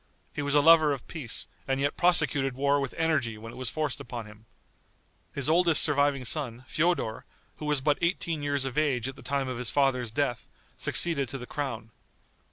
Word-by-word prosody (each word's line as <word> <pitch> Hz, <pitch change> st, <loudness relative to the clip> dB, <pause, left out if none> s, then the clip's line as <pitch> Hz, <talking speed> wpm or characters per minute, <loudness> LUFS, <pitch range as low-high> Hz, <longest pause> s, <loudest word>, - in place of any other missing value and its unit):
He -, -, -3 dB
was 145 Hz, 0 st, -1 dB
a 145 Hz, -, +6 dB
lover 155 Hz, -1 st, +6 dB
of 135 Hz, -, -8 dB
peace, 140 Hz, -9 st, -2 dB, 0.2 s
and 135 Hz, 0 st, 0 dB
yet 145 Hz, +1 st, 0 dB
prosecuted 145 Hz, -6 st, +3 dB
war 140 Hz, +2 st, +2 dB
with 135 Hz, -2 st, -4 dB
energy 155 Hz, -9 st, 0 dB
when 115 Hz, +1 st, -10 dB
it -, -, -11 dB
was 130 Hz, -3 st, -3 dB
forced 155 Hz, -4 st, -2 dB
upon 120 Hz, -2 st, -7 dB
him. 105 Hz, +1 st, -16 dB, 0.8 s
His 140 Hz, -1 st, -1 dB
oldest 170 Hz, 0 st, +5 dB
surviving 145 Hz, -3 st, +1 dB
son, 125 Hz, -3 st, -2 dB
Feodor, 155 Hz, -10 st, 0 dB, 0.3 s
who 150 Hz, -, -6 dB
was 150 Hz, -2 st, +1 dB
but 145 Hz, +1 st, +1 dB
eighteen 170 Hz, -2 st, -1 dB
years 145 Hz, -2 st, -1 dB
of 135 Hz, +2 st, -1 dB
age 135 Hz, -6 st, 0 dB
at 135 Hz, -, -6 dB
the -, -, -13 dB
time 140 Hz, -1 st, -2 dB
of 125 Hz, -2 st, -4 dB
his 125 Hz, -4 st, 0 dB
father's 125 Hz, +1 st, +1 dB
death, 120 Hz, 0 st, -2 dB, 0.3 s
succeeded 140 Hz, -7 st, 0 dB
to 135 Hz, -, -5 dB
the 125 Hz, -, -8 dB
crown. 120 Hz, -6 st, -5 dB
140 Hz, 195 wpm, -28 LUFS, 125-150 Hz, 0.8 s, a